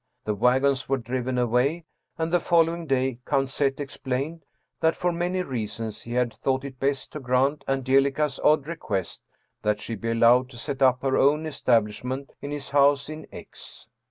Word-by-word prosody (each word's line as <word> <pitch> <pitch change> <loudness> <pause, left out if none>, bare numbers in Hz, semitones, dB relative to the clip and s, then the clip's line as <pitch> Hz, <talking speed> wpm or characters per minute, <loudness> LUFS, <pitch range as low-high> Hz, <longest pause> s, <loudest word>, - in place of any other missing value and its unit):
The 105 - 0
wagons 130 +5 +2
were 135 - +2
driven 125 +1 -3
away, 125 +7 +1 0.3
and 165 +1 -2
the 175 - +5
following 165 0 +2
day 130 -2 0
Count 135 -2 +1
Z. 135 -1 +1
explained 140 +3 -4 0.4
that, 160 0 +2
for 180 - +1
many 175 +2 -1
reasons, 115 - -4
he 120 - -7
had 125 -2 +1
thought 130 +4 -1
it 130 -2 -9
best 135 -1 -1
to 150 - -6
grant 135 +3 +1
Angelica's 135 +2 +1
odd 150 -2 +4
request 115 - -4 0.4
that 105 0 0
she 115 - -5
be 115 +2 -4
allowed 120 +2 +4
to 125 - -12
set 135 +3 -5
up 130 -1 +4
her 135 -1 +2
own 150 +3 +3
establishment 125 -1 0
in 140 - -5
his 145 -2 -6
house 140 0 +3
in 155 0 -8
X. - - -12
135 Hz, 175 wpm, -25 LUFS, 125-145 Hz, 0.4 s, the